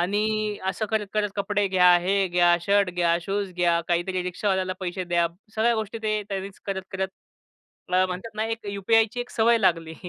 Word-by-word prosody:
आणि 195 Hz, +4 st, +1 dB, 0.4 s
अ, 190 Hz, -, -2 dB
असं 215 Hz, +3 st, -2 dB
करत-करत 210 Hz, -1 st, -1 dB
कपडे 205 Hz, 0 st, 0 dB
घ्या, 180 Hz, -1 st, +6 dB
हे 185 Hz, +3 st, 0 dB
घ्या, 175 Hz, 0 st, +4 dB
शर्ट 200 Hz, +1 st, +2 dB
घ्या, 175 Hz, -1 st, +2 dB
शूज 195 Hz, +1 st, -2 dB
घ्या, 170 Hz, -1 st, +2 dB
काहीतरी 175 Hz, +2 st, 0 dB
रिक्षावाल्याला 185 Hz, +1 st, -1 dB
पैसे 180 Hz, 0 st, -3 dB
द्या. 170 Hz, -1 st, +2 dB, 0.3 s
सगळ्या 230 Hz, +2 st, +2 dB
गोष्टी 220 Hz, 0 st, -3 dB
ते 215 Hz, -1 st, 0 dB
त्यांनीच 195 Hz, -1 st, -5 dB
करत-करत 190 Hz, -1 st, -3 dB, 0.8 s
ला 185 Hz, +1 st, +4 dB
म्हणतात 185 Hz, +5 st, -6 dB
ना 215 Hz, -, 0 dB
एक 225 Hz, -1 st, -6 dB
यूपीआयची 225 Hz, +4 st, +2 dB
एक 245 Hz, -, -6 dB
सवय 230 Hz, +1 st, +3 dB
लागली. 165 Hz, -5 st, +1 dB
190 Hz, 170 wpm, -25 LUFS, 180-210 Hz, 0.8 s, घ्या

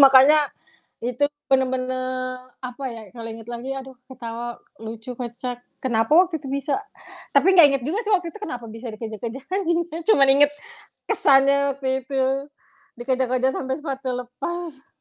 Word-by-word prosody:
makanya 275 Hz, +2 st, +8 dB, 0.6 s
itu 250 Hz, +4 st, +2 dB, 0.2 s
bener-bener 255 Hz, -1 st, 0 dB, 0.2 s
apa 255 Hz, +2 st, -6 dB
ya, 230 Hz, -2 st, -7 dB
kalau 230 Hz, -2 st, -7 dB
inget 225 Hz, +1 st, -9 dB
lagi 240 Hz, +3 st, -5 dB
aduh 265 Hz, -1 st, -8 dB
ketawa 240 Hz, -2 st, -6 dB, 0.2 s
lucu 225 Hz, +2 st, -7 dB
kocak. 245 Hz, 0 st, -5 dB, 0.2 s
Kenapa 225 Hz, +1 st, +2 dB
waktu 350 Hz, -1 st, +5 dB
itu 275 Hz, -, -10 dB
bisa 280 Hz, +5 st, -1 dB, 0.6 s
tapi 325 Hz, +8 st, +6 dB
nggak 345 Hz, -5 st, +9 dB
inget 265 Hz, -, -1 dB
juga 340 Hz, +9 st, 0 dB
sih 430 Hz, -, +2 dB
waktu 360 Hz, -3 st, 0 dB
itu 425 Hz, -, -11 dB
kenapa 250 Hz, -, -5 dB
bisa 225 Hz, +3 st, -8 dB
dikejar-kejar 225 Hz, +3 st, -6 dB
anjing 350 Hz, -3 st, +1 dB
ya 325 Hz, -, -5 dB
cuman 275 Hz, -11 st, +6 dB
inget 285 Hz, +2 st, +6 dB, 0.6 s
kesannya 275 Hz, 0 st, +4 dB
waktu 265 Hz, -1 st, -2 dB
itu 270 Hz, 0 st, -1 dB, 0.8 s
dikejar-kejar 255 Hz, 0 st, +1 dB
sampai 265 Hz, 0 st, -2 dB
sepatu 270 Hz, -3 st, -4 dB
lepas. 275 Hz, +5 st, -5 dB
265 Hz, 150 wpm, -23 LUFS, 245-280 Hz, 0.8 s, nggak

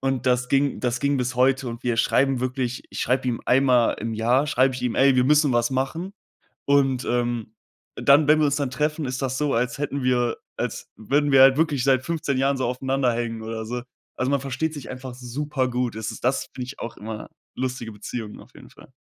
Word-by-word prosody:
und 135 Hz, -2 st, -1 dB
das 125 Hz, 0 st, +2 dB
ging 140 Hz, +1 st, +2 dB
das 120 Hz, -1 st, -1 dB
ging 140 Hz, 0 st, +1 dB
bis 130 Hz, 0 st, -2 dB
heute 130 Hz, +1 st, +2 dB
und 115 Hz, +1 st, -7 dB
wir 120 Hz, -2 st, 0 dB
schreiben 135 Hz, +2 st, +2 dB
wirklich 130 Hz, -1 st, -2 dB
ich -, -, -7 dB
schreibe 130 Hz, +1 st, 0 dB
ihm 120 Hz, -, -2 dB
einmal 125 Hz, -2 st, +4 dB
im 115 Hz, +1 st, -3 dB
Jahr 120 Hz, +6 st, +2 dB
schreibe 130 Hz, -1 st, +2 dB
ich 125 Hz, -, -6 dB
ihm: 125 Hz, -2 st, -1 dB
„Ey, 135 Hz, 0 st, +4 dB
wir 125 Hz, -, +4 dB
müssen 150 Hz, 0 st, +4 dB
was 120 Hz, +1 st, +2 dB
machen“ 135 Hz, +8 st, -2 dB, 0.5 s
und, 135 Hz, -3 st, +2 dB
ähm, 120 Hz, -2 st, -1 dB, 0.4 s
dann 140 Hz, +2 st, +4 dB
wenn 155 Hz, +1 st, +5 dB
wir 155 Hz, -, +3 dB
uns 140 Hz, -, +1 dB
dann 140 Hz, -3 st, -2 dB
treffen, 150 Hz, +4 st, -1 dB
ist 130 Hz, 0 st, -3 dB
das 130 Hz, -1 st, -1 dB
so, 145 Hz, -1 st, 0 dB
als 120 Hz, +1 st, 0 dB
hätten 140 Hz, -1 st, -3 dB
wir 120 Hz, -1 st, +1 dB, 0.2 s
als -, -, -4 dB
würden 145 Hz, +6 st, 0 dB
wir 135 Hz, -, +7 dB
halt 135 Hz, 0 st, +7 dB
wirklich 150 Hz, -5 st, +1 dB
seit 130 Hz, -1 st, +3 dB
15 155 Hz, -5 st, -1 dB
Jahren 135 Hz, +1 st, +2 dB
so 130 Hz, -, -1 dB
aufeinander 130 Hz, 0 st, 0 dB
hängen 115 Hz, -1 st, -3 dB
oder 110 Hz, 0 st, -5 dB
so. 120 Hz, +2 st, -4 dB, 0.3 s
Also, 130 Hz, +2 st, 0 dB
man 140 Hz, -, +2 dB
versteht 140 Hz, +4 st, -3 dB
sich 145 Hz, -4 st, -8 dB
einfach 130 Hz, 0 st, -7 dB
supergut. 125 Hz, -1 st, -2 dB
Es 110 Hz, -1 st, -4 dB
ist -, -, -10 dB
das, 130 Hz, +2 st, +1 dB
finde 125 Hz, -, -5 dB
ich, 135 Hz, -, -9 dB
auch 115 Hz, -, -6 dB
immer 110 Hz, 0 st, -7 dB, 0.3 s
lustige 125 Hz, -3 st, -4 dB
Beziehungen 105 Hz, +1 st, -7 dB
auf -, -, -16 dB
jeden -, -, -14 dB
Fall. -, -, -18 dB
130 Hz, 220 wpm, -24 LUFS, 120-140 Hz, 0.5 s, wir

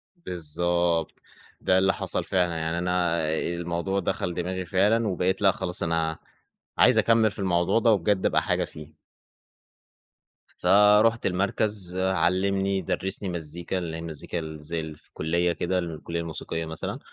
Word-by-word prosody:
بالضبط، 85 Hz, -, -1 dB, 0.4 s
ده 95 Hz, -, +3 dB
اللي 95 Hz, +1 st, +3 dB
حصل -, -, -1 dB
فعلًا، 90 Hz, -3 st, 0 dB
يعني 80 Hz, +1 st, -2 dB
أنا 90 Hz, -1 st, +1 dB
آآ، 80 Hz, 0 st, 0 dB, 0.2 s
الموضوع 85 Hz, +3 st, -2 dB
دخل 90 Hz, -1 st, -2 dB
دماغي 90 Hz, +1 st, -3 dB
فعلًا، 105 Hz, +6 st, +2 dB
وبقيت 95 Hz, 0 st, 0 dB
لأ 95 Hz, -1 st, +6 dB
خلاص 90 Hz, -1 st, -3 dB
أنا 80 Hz, -1 st, 0 dB, 0.6 s
عايز -, -, +5 dB
أكمّل 115 Hz, -2 st, +4 dB
في -, -, -9 dB
الموضوع 90 Hz, +2 st, +2 dB
ده، 115 Hz, 0 st, +4 dB
وبجد 100 Hz, -1 st, +1 dB
أبقى -, -, +3 dB
حاجة -, -, 0 dB
فيه. 75 Hz, 0 st, -12 dB, 1.6 s
فرُحت 105 Hz, +3 st, +5 dB
المركز، 95 Hz, 0 st, -1 dB
علّمني 95 Hz, +2 st, +1 dB
درّسني 95 Hz, 0 st, -2 dB
مزيكا، 85 Hz, +2 st, -4 dB
اللي 85 Hz, -3 st, -4 dB
هي 80 Hz, -, -6 dB
مزيكا 85 Hz, +1 st, -5 dB
ال 80 Hz, -1 st, -7 dB
زي 80 Hz, 0 st, -5 dB
في -, -, -19 dB
الكلية 85 Hz, +3 st, 0 dB
كده، 90 Hz, +3 st, -1 dB
الكلية 85 Hz, 0 st, -4 dB
الموسيقية 80 Hz, 0 st, -4 dB
مثلًا، 80 Hz, 0 st, -4 dB
90 Hz, 145 wpm, -26 LUFS, 85-95 Hz, 1.6 s, لأ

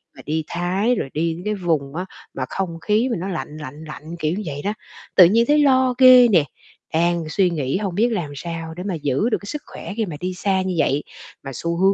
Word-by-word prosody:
mà -, -, -11 dB
đi 155 Hz, +2 st, -1 dB
Thái 185 Hz, +7 st, 0 dB
rồi 135 Hz, -, -3 dB
đi 165 Hz, +2 st, -1 dB
cái 210 Hz, -, 0 dB
vùng 160 Hz, -7 st, -1 dB
á 180 Hz, +2 st, -3 dB, 0.3 s
mà -, -, -3 dB
không 175 Hz, -4 st, -3 dB
khí 220 Hz, +7 st, +2 dB
mà 230 Hz, -, 0 dB
nó 185 Hz, -, -4 dB
lạnh 155 Hz, -4 st, -5 dB
lạnh 150 Hz, +1 st, -8 dB
lạnh, 155 Hz, +2 st, -8 dB
kiểu 155 Hz, 0 st, 0 dB
như 210 Hz, -, -3 dB
vậy 145 Hz, -1 st, -4 dB
đó, 205 Hz, -, 0 dB, 0.4 s
tự 180 Hz, -, +9 dB
nhiên 225 Hz, +7 st, +4 dB
thấy 295 Hz, +1 st, +4 dB
lo 260 Hz, -3 st, +4 dB
ghê 255 Hz, -1 st, +9 dB
nè, 180 Hz, -9 st, +4 dB, 0.5 s
đang 170 Hz, 0 st, +1 dB
suy 185 Hz, +2 st, +2 dB
nghĩ 150 Hz, -3 st, -1 dB
hông 195 Hz, -3 st, -3 dB
biết 230 Hz, +5 st, +3 dB
làm 170 Hz, -8 st, -3 dB
sao 165 Hz, +1 st, -5 dB
để 180 Hz, -, -5 dB
mà 195 Hz, -1 st, -2 dB
giữ 150 Hz, -, 0 dB
được 225 Hz, -, +1 dB
cái -, -, -12 dB
sức 300 Hz, +7 st, -4 dB
khỏe -, -, -8 dB
khi 225 Hz, -, +1 dB
mà 170 Hz, -6 st, -6 dB
đi 185 Hz, +2 st, -3 dB
xa 190 Hz, +1 st, 0 dB
như 185 Hz, -1 st, -2 dB
vậy 145 Hz, -1 st, +1 dB, 0.4 s
mà 135 Hz, -, -6 dB
xu 170 Hz, +7 st, -3 dB
hướng 190 Hz, +2 st, +4 dB
175 Hz, 245 wpm, -21 LUFS, 160-210 Hz, 0.5 s, tự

